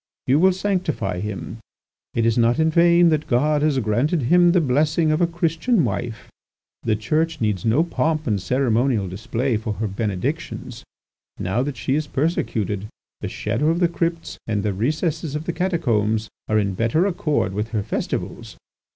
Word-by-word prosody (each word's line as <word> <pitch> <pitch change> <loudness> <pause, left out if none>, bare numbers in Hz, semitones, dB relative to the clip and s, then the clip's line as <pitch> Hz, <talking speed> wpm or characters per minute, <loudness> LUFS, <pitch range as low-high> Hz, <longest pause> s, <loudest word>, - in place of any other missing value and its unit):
You 135 +4 +3
will 190 +3 +5
sanctify 180 - -1
him. 105 +2 -5 0.6
It 115 - +2
is 115 -1 +3
not 120 +1 +3
in 160 0 +2
vain 170 +1 +5
that 155 -1 0
God 145 +4 +2
has 150 -2 +2
granted 130 - +1
him 175 +7 +5
the 180 - +4
blessing 155 +3 +2
of 155 +3 +1
a 175 - +4
Christian 170 +5 +1
wife. 120 -2 -4 0.5
The 110 -2 +1
Church 155 +9 -1
needs 105 -5 -1
no 115 +8 +3
pomp 160 -2 -1
and 105 -5 0
ceremonial 120 -1 +1
display 115 +6 -1
for 110 0 -3
her 110 +2 -3
benedictions. 100 -2 -4 0.6
Now 95 +7 0
that 135 -1 -3
she 120 +5 -1
is 150 +1 0
persecuted, 110 - -1 0.3
the - - -4
shadow 115 +8 -1
of 165 +1 +1
the 175 - +4
crypts 165 0 -3
and 105 -3 -1
the 105 -2 0
recesses 155 - -1
of 150 - -3
the 170 - -3
catacombs 115 - 0 0.2
are 110 - +3
in 100 -2 +1
better 115 - +1
accord 155 - 0
with 105 +2 -2
her 110 -3 -2
festivals. - - -4
135 Hz, 170 wpm, -22 LUFS, 110-165 Hz, 0.6 s, will